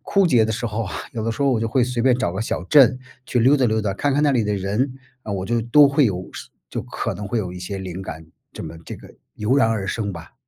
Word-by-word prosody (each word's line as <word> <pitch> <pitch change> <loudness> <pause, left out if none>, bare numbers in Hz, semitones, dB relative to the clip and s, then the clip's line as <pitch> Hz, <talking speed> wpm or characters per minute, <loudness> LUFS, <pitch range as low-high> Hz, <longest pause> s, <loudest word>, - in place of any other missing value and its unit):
枯 195 -2 +2
竭 120 -8 +4
的 110 - -2
时 115 +2 -3
候 115 +1 -2
啊， 100 - -7 0.2
有 115 - -4
的 115 - -1
时 115 +5 -3
候 140 - +3
我 115 - 0
就 115 - -1
会 125 +1 +2
随 125 -2 -2
便 125 -1 +4
找 85 - -1
个 95 - -4
小 90 -5 -3
镇 130 +1 +5 0.3
去 125 - 0
溜 130 +5 +5
达 130 - +2
溜 110 -1 +1
达， 100 -2 -1
看 140 +8 0
看 145 - +2
那 145 -2 +3
里 120 -3 +2
的 105 - -1
人， 105 +8 -1 0.3
啊， 110 - -7
我 95 -1 -3
就 120 0 +1
都 140 +5 +6
会 140 0 +3
有 90 -2 -3
是 - - -9 0.2
就 - - -3
可 - - -4
能 105 - -6
会 115 - 0
有 95 -4 -3
一 90 - -8
些 95 +2 -5
灵 95 0 -6
感， 80 -4 -8 0.3
这 - - -9
么 85 - -8
这 - - -7
个 - - -15 0.2
油 110 +6 +1
然 115 -5 +4
而 105 -4 -2
生 100 -1 -2
吧。 85 - -11
115 Hz, 315 characters per minute, -22 LUFS, 100-130 Hz, 0.3 s, 都